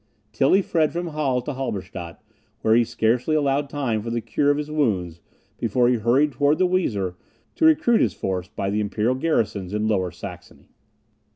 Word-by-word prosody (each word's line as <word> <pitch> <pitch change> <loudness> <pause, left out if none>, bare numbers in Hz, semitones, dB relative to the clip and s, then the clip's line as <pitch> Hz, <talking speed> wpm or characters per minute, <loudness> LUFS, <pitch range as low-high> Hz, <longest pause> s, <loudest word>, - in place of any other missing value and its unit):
Tilly 140 - +3
fled 160 -4 +1
from 175 0 -3
Halle 140 -5 -1
to 145 - -4
Halberstadt, 95 - -5 0.4
where 110 - +3
he 120 +1 +5
scarcely 120 +7 0
allowed 140 -1 +1
time 130 -7 -1
for 115 - -5
the 120 0 -1
cure 140 +5 0
of 145 - +3
his 150 0 -4
wounds, 95 - -1 0.4
before 120 +2 +2
he 125 - +2
hurried 125 +7 +2
towards 145 +3 +2
the 185 - +3
Weser 110 - 0 0.4
to 320 - +1
recruit 300 -7 +4
his 100 -7 +1
force 95 -1 -3
by 95 +1 -3
the 105 - 0
imperial 105 +3 0
garrisons 105 - -1
in 105 +1 0
Lower 95 -4 +1
Saxony. - - -11
120 Hz, 180 wpm, -23 LUFS, 105-150 Hz, 0.4 s, he